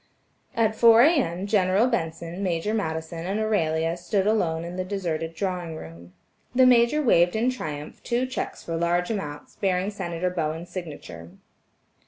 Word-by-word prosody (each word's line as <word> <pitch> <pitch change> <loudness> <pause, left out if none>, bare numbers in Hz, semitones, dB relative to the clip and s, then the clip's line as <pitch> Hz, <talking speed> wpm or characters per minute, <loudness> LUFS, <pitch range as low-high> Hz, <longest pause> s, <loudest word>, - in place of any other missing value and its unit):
At 220 -2 +2
four 230 +1 +7
A.M., 245 - +2
General 200 +1 +3
Benson, 170 -5 -3
Major 180 +2 -1
Madison 165 -4 -3
and 200 +3 -1
Aurelia 165 -6 +1
stood 190 +3 -1
alone 170 -7 +1
in 175 +1 -6
the 185 - -2
deserted 165 -4 -3
drawing 180 -4 -3
room. 85 - -11 0.4
The 255 0 +6
Major 250 +4 +4
waved 175 -7 +4
in 235 +4 +2
triumph 150 -11 -6
two 245 +1 0
checks 255 +1 -5
for 165 - -4
large 175 +3 +1
amounts, 150 -9 -6
bearing 190 0 0
Senator 180 -3 -3
Bowen's 165 0 -3
signature. 145 - -8
180 Hz, 150 wpm, -25 LUFS, 165-215 Hz, 0.4 s, four